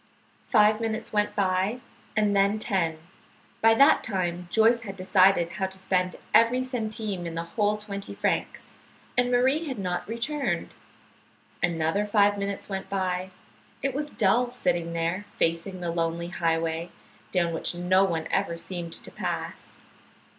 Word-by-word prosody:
Five 215 +1 +4
minutes 220 -1 -3
went 210 0 +1
by 195 +4 +1 0.4
and 210 -1 +3
then 200 +2 +3
ten. 175 -7 0 0.6
By 225 0 +6
that 280 +6 +6
time 180 -4 -2
Joyce 230 +4 +4
had 200 -4 -7
decided 185 -2 +4
how 190 +1 -2
to 190 0 -6
spend 185 -1 0 0.2
every 245 +3 +5
centime 215 -7 -3
in 165 - -6
the 165 - -2
whole 210 +4 0
twenty 200 -1 -6
francs, - - -2 0.4
and 245 0 +2
Marie 260 +6 +2
had 260 -4 -4
not 180 -3 -3
returned. 270 +5 -2 0.9
Another 170 +4 +1
five 205 -1 +4
minutes 200 0 -3
went 195 -1 -5
by. 185 -1 -1 0.5
It 275 -1 0
was 295 +2 -3
dull, 235 +2 +2
sitting 175 -9 -1
there 170 +4 -1
facing 170 +3 0
the 170 -1 -2
lonely 170 0 -1
highway, 165 0 -1 0.4
down 170 -3 +1
which 165 - -2
no 180 +2 +3
one 165 -4 -1
ever 190 -4 0
seemed 170 -1 -5
to - - -7
pass. - - -5
195 Hz, 145 wpm, -26 LUFS, 175-220 Hz, 0.9 s, By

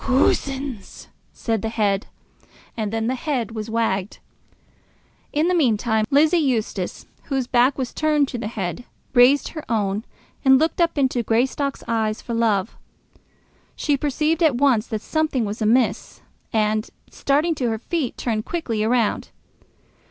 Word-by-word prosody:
"Coosins!" 265 -3 -1 0.2
said 225 -3 -2
the 225 - -2
head; 205 -3 0 0.7
and 215 -3 -3
then 225 0 -1
the 250 - 0
head 255 -4 -2
was 220 -1 -5
wagged. 215 -4 -1 1.1
In 305 +3 +1
the 365 - +2
meantime 220 - +2
Lizzie 310 +5 +4
Eustace, 225 - -2 0.2
whose 270 -3 -1
back 250 +2 +3
was 260 -3 -3
turned 300 -2 +2
to 245 - -4
the 210 - -3
head, 210 +1 -4 0.3
raised 260 +3 +5
her 310 -2 -7
own, 210 -2 0 0.4
and 265 -1 +7
looked 320 +4 +1
up 335 -2 +1
into 260 -3 +1
Greystock's 255 +5 0
eyes 220 -1 0
for 235 - -6
love. 220 -3 +1 1.0
She 290 - +1
perceived 300 +4 0
at 310 -6 +4
once 250 -5 +3
that 220 -2 -3
something 305 -6 0
was 210 +3 -5
amiss, 230 +3 +1 0.3
and, 215 0 0 0.2
starting 300 +5 +1
to 255 -6 -1
her 220 - -1
feet, 275 +2 -3
turned 220 -3 -1
quickly 230 -11 -2
round. 230 -1 +1
245 Hz, 145 wpm, -22 LUFS, 220-280 Hz, 1.1 s, and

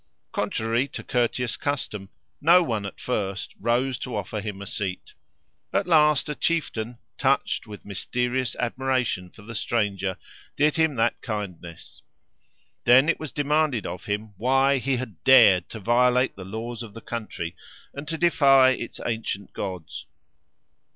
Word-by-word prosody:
Contrary 115 +4 0
to - - -8
courteous 120 -1 0
custom 110 -9 -3 0.3
no 170 +4 +6
one 110 -9 -2
at - - -10
first 100 -5 -3
rose 120 +3 0
to 125 - -5
offer 105 +1 -3
him 105 -2 -5
a 100 - -7
seat. 95 -1 -4 0.6
At - - +1
last 150 -4 +4
a 150 - -2
chieftain, 125 -8 -1 0.2
touched - - +1
with 105 -1 -10
mysterious 125 +6 -1
admiration 125 -6 -1
for 105 - -16
the 115 +2 -9
stranger, 100 -5 -1 0.4
did 150 +1 +3
him 160 -3 +2
that 115 0 +1
kindness. 90 -7 -6 0.8
Then 130 +6 +6
it 165 - +1
was 155 -4 -5
demanded 145 -4 +1
of 90 - -6
him, 105 +1 -3
why 135 +4 +3
he 130 0 0
had 115 -8 -7
dared 115 -8 +6
to 110 - -7
violate 125 +4 +3
the 95 - -9
laws 115 +4 -5
of 115 -3 -9
the 115 - -8
country, 105 -8 -5 0.4
and 140 +2 -7
to 160 +1 -3
defy 135 -6 +5
its 120 -2 -4
ancient 110 -4 -3
gods. 90 -5 -6
120 Hz, 150 wpm, -25 LUFS, 105-135 Hz, 0.8 s, no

